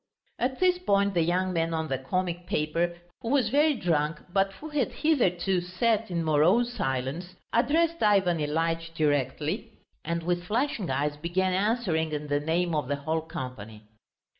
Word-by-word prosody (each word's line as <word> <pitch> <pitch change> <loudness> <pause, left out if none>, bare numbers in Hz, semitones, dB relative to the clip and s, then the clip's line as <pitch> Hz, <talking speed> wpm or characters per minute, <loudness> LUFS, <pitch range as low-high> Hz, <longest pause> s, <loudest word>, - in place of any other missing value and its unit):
At 260 +1 -1
this 365 -1 +3
point 200 - +2
the 175 - +2
young 180 +3 +1
man 165 -1 0
on 160 0 -2
the 135 -3 -2
comic 175 +4 -2
paper, 170 0 0 0.2
who 230 - -4
was 275 -1 +2
very 295 +2 +3
drunk 160 -6 0
but 195 0 +2
who 310 +10 -9
had 290 -5 0
hitherto 190 - +1
sat 215 +5 0
in 170 -2 -1
morose 175 +11 +3
silence, 135 - -3 0.2
addressed 320 +8 +2
Ivan 195 -5 +3
Ilyitch 165 +2 -1
directly, 145 -1 -1 0.3
and 170 +1 -2
with 175 +1 -1
flashing 225 -1 -1
eyes 145 +2 -1
began 180 +4 0
answering 185 -6 0
in 150 0 -4
the 145 0 +2
name 165 +3 0
of 150 -4 -1
the 145 - 0
whole 155 +3 -2
company. 120 -8 -7
175 Hz, 165 wpm, -27 LUFS, 155-210 Hz, 0.3 s, this